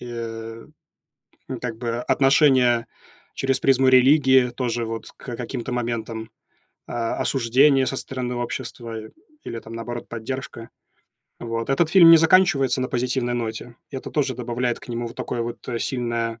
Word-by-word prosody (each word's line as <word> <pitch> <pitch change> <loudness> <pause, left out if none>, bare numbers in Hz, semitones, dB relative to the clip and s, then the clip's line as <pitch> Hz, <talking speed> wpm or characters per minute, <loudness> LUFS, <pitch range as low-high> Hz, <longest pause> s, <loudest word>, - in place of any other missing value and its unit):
э, 115 -1 -7 0.8
ну 130 -3 -4
как 115 -2 -4
бы 115 -1 -3
отношения 130 -3 +3 0.5
через 135 -1 0
призму 135 -1 +3
религии 130 -1 +5
тоже, 120 -1 -2
вот, 115 0 -6
к 120 -3 -7
каким-то 125 0 -5
моментам, 115 -2 -3 0.6
а, 115 -1 -3
осуждение 135 +2 +3
со 135 - -2
стороны 125 -2 -4
общества 120 -1 -5 0.5
или, 115 - -5
там, 115 - -12
наоборот, 120 +1 -6
поддержка. 115 0 -6 0.7
Вот. 115 +1 -3
Этот 155 +4 +2
фильм 175 -3 +8
не 165 - +10
заканчивается 160 -6 +4
на 130 - -1
позитивной 125 -1 -1
ноте. 115 0 -5
И 135 - -6
это - - -7
тоже 135 -4 0
добавляет 120 0 -2
к - - -14
нему 120 0 -3
вот - - -13
такое 120 -1 -3
вот 120 0 -5 0.2
сильное, 115 -2 -2
120 Hz, 145 wpm, -23 LUFS, 115-130 Hz, 0.8 s, не